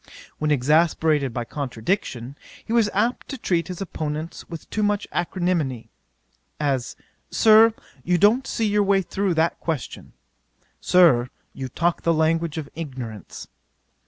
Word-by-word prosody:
'When 155 - 0
exasperated 150 0 +2
by 120 0 -4
contradiction, 130 - -3 0.3
he 225 - -3
was 230 -3 +3
apt 225 +5 0
to 270 - -6
treat 170 -8 0
his 180 0 -7
opponents 155 -3 -5
with 165 -2 -8
too 215 - -1
much 205 0 0
acrimony: 170 -9 -1 0.7
as, 135 -5 -1 0.3
"Sir, 220 0 +6 0.3
you 180 0 +2
don't 225 +8 +3
see 225 - -1
your 210 0 +2
way 195 -1 +2
through 190 0 -1
that 160 +1 +1
question:" 160 -7 -5 0.7
"Sir, 150 -10 +4 0.2
you 130 -1 -6
talk 170 +6 0
the 165 -1 +2
language 165 0 +1
of 155 -3 -4
ignorance." 125 - -7
165 Hz, 135 wpm, -23 LUFS, 140-195 Hz, 0.7 s, Sir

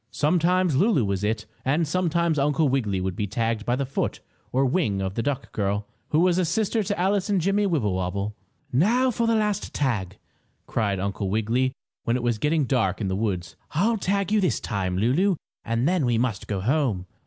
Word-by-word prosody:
Sometimes 175 +3 +2
Lulu 165 - +3
was 100 0 -1
"it" 105 +1 -1 0.2
and 150 +5 +1
sometimes 170 -1 +1
Uncle 150 +2 +2
Wiggily 115 -8 0
would 95 -1 -2
be 105 - -2
tagged 115 +1 -1
by 120 - +2
the 135 +1 -1
foot 135 - -2 0.3
or 135 +2 +2
wing 130 - +1
of 95 -1 -2
the 115 - -1
duck 140 +1 -3
girl, 100 0 -1 0.2
who 155 - +3
was 180 0 +3
a - - +3
sister 215 +6 0
to 200 -2 -2
Alice 195 +2 +1
and 200 -2 +2
Jimmie 195 +4 +2
Wibblewobble. 100 - -1 0.4
"Now 235 - +3
for 235 0 0
a 230 - +3
last 210 -2 -1
tag!" 105 -10 -1 0.5
cried 100 -4 -1
Uncle 100 0 -2
Wiggily 115 +5 +1 0.3
when 115 - +1
it 125 - -2
was 120 -3 0
getting 150 +3 +2
dark 115 -7 +1
in 100 -4 -1
the 95 - -1
woods. 95 -4 -2 0.2
"I'll 220 +8 +2
tag 200 +1 0
you 215 -1 +3
this 185 - +1
time, 95 -3 -2
Lulu, 145 - +2 0.3
and 115 +3 0
then 175 -7 +2
we 120 -1 +2
must 115 -5 -1
go 100 -3 -2
home." 120 -6 +1
130 Hz, 200 wpm, -25 LUFS, -, 0.5 s, Lulu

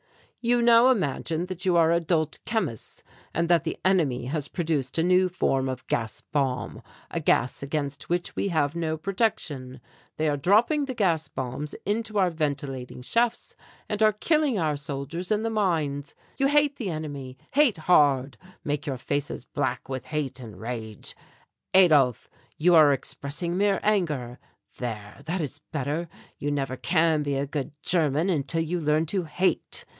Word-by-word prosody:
"You 240 0 +3
now 235 +1 +7
imagine 165 - 0
that 185 -1 -6
you 175 -2 +4
are 165 -1 +5
adult 165 -2 +1
chemists 215 - -3 0.3
and 170 +1 +1
that 170 -1 +4
the 160 - -3
enemy 155 -11 +2
has 145 +2 -2
produced 160 -6 -2
a 165 - +3
new 185 +1 +4
form 135 -7 0
of 130 -1 -5
gas 115 -2 -2
bomb, 135 -4 -2 0.3
a - - -1
gas 125 +1 +1
against 140 0 -3
which 175 0 -1
we - - 0
have 155 -4 0
no 160 -2 -1
protection. 155 - -2 0.4
They 155 - +1
are 145 -1 +1
dropping 225 - +3
the 260 -2 -5
gas 165 -8 +1
bombs 135 +3 -5
into 215 +1 -1
our 185 -3 +3
ventilating 140 -5 -3
shafts 235 - 0 0.3
and 210 0 -3
are 215 0 +6
killing 290 +3 +1
our 155 -4 +1
soldiers 145 +6 -5
in 215 +1 +2
the 225 - -1
mines. 155 -9 -1 0.2
You 275 - +4
hate 290 0 +3
the 215 -6 -3
enemy 145 -5 -5 0.2
hate 280 - +4
hard 145 -5 +3 0.3
make 145 0 -2
your 135 -2 -2
faces 145 +3 -3
black - - -2
with 130 -1 -5
hate 150 -4 -3
and 110 -7 -10
rage. 110 -2 -6 0.6
Adolph, 150 - +5 0.3
you 175 +3 +4
are 155 -3 +8
expressing 145 +5 -3
mere 200 0 +2
anger. 150 - 0 0.4
There, 105 -1 -5
that 175 +2 -1
is 145 -1 -5
better. 150 +3 -2 0.3
You 145 - -2
never 135 -3 -1
can 160 -1 +2
be 145 -1 -1
a 135 +1 0
good 140 -1 -4
German 160 +1 +2
until 160 +1 0
you 175 +2 -2
learn 155 0 +2
to 180 +2 -1
hate. 180 +5 -1
155 Hz, 165 wpm, -26 LUFS, 140-185 Hz, 0.6 s, are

